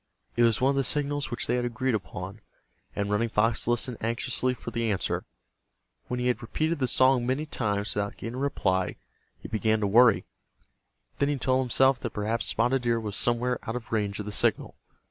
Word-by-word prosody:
It 120 - +2
was 115 -2 +4
one 130 +2 +3
of - - -1
the 135 - +2
signals 145 +2 -1
which 120 - -4
they - - +1
had 125 - 0
agreed 120 +2 -1
upon, 100 0 -5 0.5
and 100 0 -1
Running 115 +3 +1
Fox 115 +2 +1
listened 120 0 0
anxiously 125 +2 -1
for - - -7
the 115 -2 0
answer. 95 - -1 0.8
When 125 - -2
he 125 - -1
had 125 -1 +1
repeated 155 +7 -1
the 130 - +1
song 130 0 +4
many 135 +4 0
times 105 -8 -1
without 105 0 -2
getting 115 - -6
a - - -6
reply 95 -9 0 0.4
he - - -9
began 110 0 +1
to - - +2
worry. 115 +2 +5 0.9
Then 140 - +2
he 145 - 0
told 130 0 +2
himself 130 +1 +3
that 120 - -3
perhaps 110 +2 -1
Spotted 120 +3 +1
Deer 120 -1 +1
was 105 -3 -4
somewhere 120 +1 +1
out 115 - -2
of 120 -2 -6
range 105 -3 0
of 105 - -4
the 105 - -5
signal. - - +1
120 Hz, 205 wpm, -27 LUFS, 110-130 Hz, 0.9 s, worry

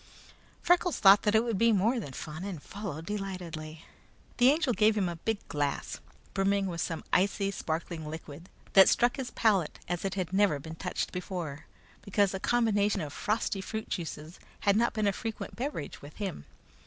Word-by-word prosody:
Freckles 355 -1 +3
thought 195 0 +7
that 210 0 +2
it 220 - +5
would 230 -5 -1
be 230 0 +5
more 220 +5 +2
than 165 -11 -6
fun, 155 +6 -7
and 185 -7 -6
followed 195 -6 -6
delightedly. 175 -6 -5 0.5
The 250 +1 +6
Angel 295 -3 +2
gave 215 0 +3
him 195 -3 +2
a 170 -1 -4
big 220 +5 -3
glass, 145 -1 -2 0.3
brimming 195 0 +2
with 170 -3 -3
some 165 -2 -3
icy, 195 +1 +2
sparkling 160 -2 -4
liquid 160 +2 -9 0.2
that 190 -1 +9
struck 240 +2 +3
his 265 -2 -3
palate 195 -8 +1
as 175 -1 -2
it 195 0 -2 0.2
never 200 -4 +4
had 140 - -7
been 160 - -7
touched 180 +2 -3
before, 175 -5 -5 0.3
because 200 -1 +1
a 190 - -3
combination 210 -3 +2
of 145 -3 -5
frosty 210 -2 -1
fruit 220 +3 -5
juices 160 -1 -5 0.2
had 200 -1 +3
not 235 +2 +2
been 215 -1 0
a 200 - +3
frequent 225 +2 -5
beverage 250 - -4
with 145 +1 -11
him. 190 - -5
195 Hz, 180 wpm, -30 LUFS, 165-215 Hz, 0.5 s, that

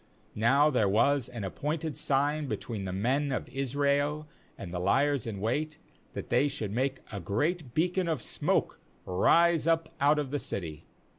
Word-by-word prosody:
38Now 140 +7 +4
there 110 -5 +3
was 130 +5 +2
an 120 -4 -6
appointed 150 - -3
sign 145 +2 0
between 110 -6 -4
the 95 - -3
men 130 +9 0
of 130 - -2
Israel 140 +3 0 0.3
and 90 -2 -8
the 90 - -2
liers 135 +7 +2
in 105 -3 -4
wait, 150 +9 -1 0.4
that - - -6
they 125 +4 +3
should 115 -8 -4
make 130 +4 -1
a 100 - -4
great 135 - -2
beac9n 180 +2 +1
of 155 -8 -1
smoke - - 0 0.3
r,ise 165 - +3
up 165 0 +2
out 145 +2 +4
of 145 -3 -2
the 145 - -1
city. 80 - -5
140 Hz, 165 wpm, -29 LUFS, 110-150 Hz, 0.4 s, 38Now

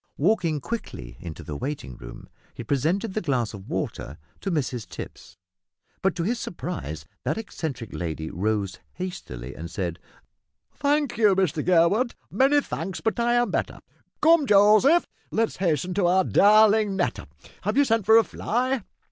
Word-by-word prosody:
Walking 165 -2 +1
quickly 65 - -6
into 85 -3 -8
the 75 - -6
waiting 130 - -5
room - - -11 0.3
he - - -6
presented 165 - 0
the 215 - -1
glass 125 -9 -1
of 100 -1 -10
water 70 +5 -4 0.2
to 195 - -3
Mrs 125 - -2
Tipps, - - -9 0.6
but 190 -1 +1
to 170 - -2
his 230 +6 -1
surprise 80 - -5 0.2
that - - -1
eccentric 150 - -5
lady 80 -2 -4
rose 100 +1 -1
hastily 70 - -6
and 85 +2 -7
said, 85 -3 -4 0.7
"Thank 290 -3 0
you, 210 -4 +5
Mr 170 -5 +1
Gurwood, 185 +8 +3 0.2
many 270 +8 +4
thanks, 180 - -5
but 225 +2 -1
I 240 0 +2
am 240 -4 +2
better. - - -2 0.5
Come, 320 -2 +5
Joseph 215 +11 +6 0.2
let 225 0 +1
us - - -12
hasten 180 -1 0
to 185 -2 +2
our 185 +2 +4
darling 210 +1 +5
Netta. 175 -11 -2 0.3
Have 210 +6 -1
you 285 - +5
sent 225 -4 +1
for 220 0 +8
a 230 - +6
fly?" 250 +4 -1
185 Hz, 160 wpm, -25 LUFS, -, 0.7 s, for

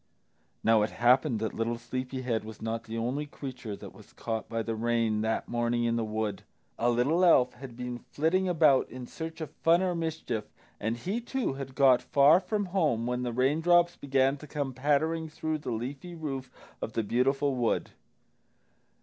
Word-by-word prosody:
Now 115 -1 +5
it 105 - +1
happened 125 +1 +3
that 115 +1 -2
Sleepy 130 +2 -4
head 115 -3 -1
was 110 -1 -9
not 115 +1 -3
the 115 0 -5
only 130 +6 -2
creature 125 -7 -7
that - - -10
was - - -17
caught 110 -1 -4
by 115 0 -2
the 115 - -2
rain 115 -1 +1
that 110 +1 -1
morning 120 0 0
in 115 0 +1
the 115 - 0
wood. 110 -2 -2 0.4
A 120 - +3
little 135 +9 +2
elf 130 -8 +5
had 120 -1 -10
been 125 -1 -5
flitting 180 +8 0
about 155 -6 +4
in 125 +1 -7
search 160 +4 -7
of 155 -2 -5
fun 170 +4 +3
or 185 -1 +1
mischief, 160 -10 -3 0.3
and 115 +2 -1
he, 195 - -3
too, 250 - -2
had 135 -1 -7
got 130 -3 +5
far 145 +5 +5
from 205 +2 -2
home 150 - +2
when 125 +1 -1
the 125 -1 -2
raindrops 165 +8 +3
began 135 0 +1
to 150 - -11
come 145 -2 -3
pattering 155 +5 +1
through 155 0 -3
the - - -6
leafy 135 +9 -5
roof 135 -5 -5 0.3
of 110 - -4
the 115 - 0
beautiful 135 +5 +1
wood. 120 -3 0
130 Hz, 185 wpm, -29 LUFS, 115-155 Hz, 0.4 s, Now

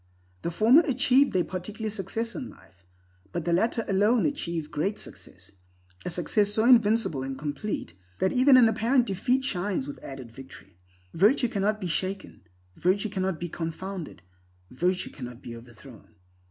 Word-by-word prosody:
The - - -2
former 225 - +5
achieve 270 -2 +3
their 185 -2 +2
particular 210 +5 -5
success 225 +3 -3
in 265 -4 -6
life, 90 0 -20 0.4
but - - -4
the 170 - +1
latter 225 +5 +1
alone 210 +4 +3
achieve 170 - -2
the 150 - -15
Great 185 +8 -1
Success, - - -8 0.5
a - - -3
success 180 +5 +1
so 220 +2 +1
invincible 225 - +4
and 135 0 -5
complete 150 +9 -4 0.2
that 190 - +1
even 260 +1 +6
an 245 -3 +7
apparent 230 +3 +2
defeat 245 +6 0
shines 190 - -1
with 145 - -9
added 130 -4 -8
victory. 100 -8 -13 0.3
Virtue 230 - +3
cannot 210 +1 0
be 190 - -5
shaken; 190 +3 -3 0.3
virtue 195 +4 +1
cannot 190 -4 -2
be 175 - -3
confounded; 170 - -6 0.5
virtue 180 +8 -1
cannot 125 -3 -9
be 115 - -7
overthrown. 115 -1 -15
190 Hz, 155 wpm, -27 LUFS, 155-225 Hz, 0.5 s, an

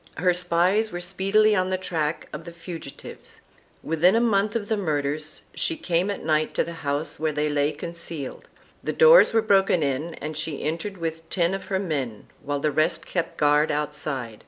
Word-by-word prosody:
Her 180 +3 +3
spies 180 +5 +2
were 175 - -4
speedily 195 +4 +2
on 185 -1 +1
the 185 - 0
track 165 -4 -2
of 150 +2 -7
the 170 - -7
fugitives; 165 -4 -9 0.4
within 165 +5 +3
a - - +4
month 215 -2 +2
of 210 -3 -2
the 220 - +1
murders 155 -4 -2
she 165 - 0
came 175 +2 0
at 200 - -4
night 155 0 +1
to - - +2
the 170 - -7
house 145 +2 -2
where 155 0 0
they 150 0 0
lay 145 0 +1
concealed; 165 -2 -6 0.4
the - - -2
doors 485 +1 +7
were 225 -1 +2
broken 195 -5 +3
in 145 +4 -2
and 155 +1 -6
she 155 -1 -3
entered 170 +6 -3
with 165 -1 -5
ten 175 0 +1
of 195 - -4
her 190 0 -1
men 140 - -3 0.2
while 145 0 -2
the 150 +1 0
rest 155 +3 +1
kept 170 -2 -3
guard 150 +1 +3
outside. 145 -6 -3
165 Hz, 190 wpm, -25 LUFS, 150-190 Hz, 0.4 s, doors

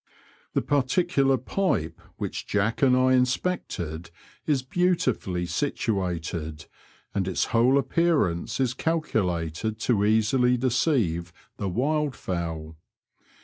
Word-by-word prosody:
The - - +2
particular 140 0 +2
pipe 120 - -1 0.2
which - - -4
Jack 105 +3 0
and 130 -2 +5
I 130 0 +4
inspected 125 - -1 0.4
is 140 -4 +2
beautifully 130 - 0
situated, 85 - -2 0.5
and 95 -2 -1
its 95 - 0
whole 120 +4 +5
appearance 140 - +1
is 130 -2 +1
calculated 110 - -1
to 105 -4 +2
easily 115 +4 +3
deceive 120 - +1 0.3
the 100 - -2
wild 145 - 0
fowl. 80 -3 -4
115 Hz, 105 wpm, -26 LUFS, 90-135 Hz, 0.5 s, and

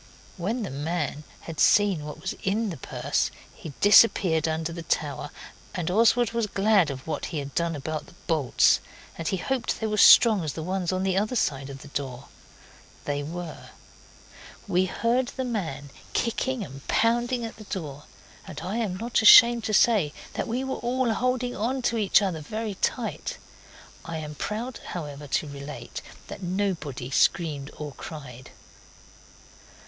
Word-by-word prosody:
When 215 +7 -2
the 195 - -5
man 150 +1 -3 0.2
had 165 -2 -8
seen 200 -7 +4
what 150 - -7
was 185 - -3
in 210 +2 0
the 165 - -6
purse - - -1 0.2
he 160 - -9
disappeared 190 -6 +5
under 160 +1 -2
the 170 - -6
tower, 145 -3 -2 0.5
and 180 -2 -2
Oswald 230 +3 +4
was 230 -2 -1
glad 200 -4 +3
of 135 -1 -6
what 160 - -3
he 160 - -5
had 140 -1 -5
done 170 -1 0
about 150 +2 -4
the - - -17
bolts 150 -7 +3 0.4
and 165 - -5
he 190 - 0
hoped 255 +5 -2
they 220 - -2
were 215 - -2
as 210 - +4
strong 220 -6 +8
as 150 - -3
the 160 - -5
ones 185 0 -1
on 185 0 -1
the 190 -1 +1
other 215 +6 0
side 140 - 0
of 135 -1 -9
the - - -11
door. 135 -2 -5 0.8
They 145 0 -1
were. 170 +2 -7 1.0
We 185 -1 +2
heard 240 +6 0
the 260 - -4
man 165 - -4 0.2
kicking 245 +1 -1
and 135 0 -12
pounding 240 +1 +1
at 225 - -8
the 215 - -11
door, 150 -8 -6 0.4
and - - -7
I 190 +6 -3
am 205 -6 -1
not 230 +2 0
ashamed 235 +1 +9
to - - -1
say 200 -10 +4 0.2
that - - -3
we 245 +3 -2
were 265 0 -3
all 245 -1 0
holding 250 +1 -1
on 250 +5 -1
to 235 - +1
each 210 -1 +4
other 180 -5 -1
very 215 +7 -4
tight. - - -2 0.7
I 165 -1 -5
am 150 -1 -6
proud, 220 - -4
however, 150 -4 -6
to 150 - -1
relate 140 +1 -7 0.2
that - - -9
nobody 175 -9 -2
screamed 145 -2 +1
or 150 -1 -5
cried. 130 -2 -9
180 Hz, 170 wpm, -26 LUFS, 150-225 Hz, 1.0 s, ashamed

